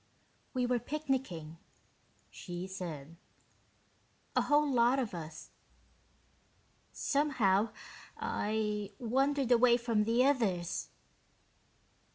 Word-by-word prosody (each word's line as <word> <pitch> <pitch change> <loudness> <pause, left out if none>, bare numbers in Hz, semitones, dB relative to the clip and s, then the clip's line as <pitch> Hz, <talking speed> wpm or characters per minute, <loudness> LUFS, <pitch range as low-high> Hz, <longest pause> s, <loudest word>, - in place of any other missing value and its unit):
"We 250 -1 +2
were 245 0 +1
picnicking," 255 - -3 0.7
she 175 0 -6
said. 170 -5 -7 1.2
"A - - +4
whole 295 +1 +3
lot 245 -1 +3
of 245 -7 -2
us. 160 -2 -8 1.4
Somehow, 230 -8 +2 0.5
I 210 -1 -2
wandered 265 +3 +1
away 240 0 +6
from 230 -3 +1
the 235 +3 +3
others...." 195 -11 0
230 Hz, 85 wpm, -32 LUFS, 190-265 Hz, 1.4 s, away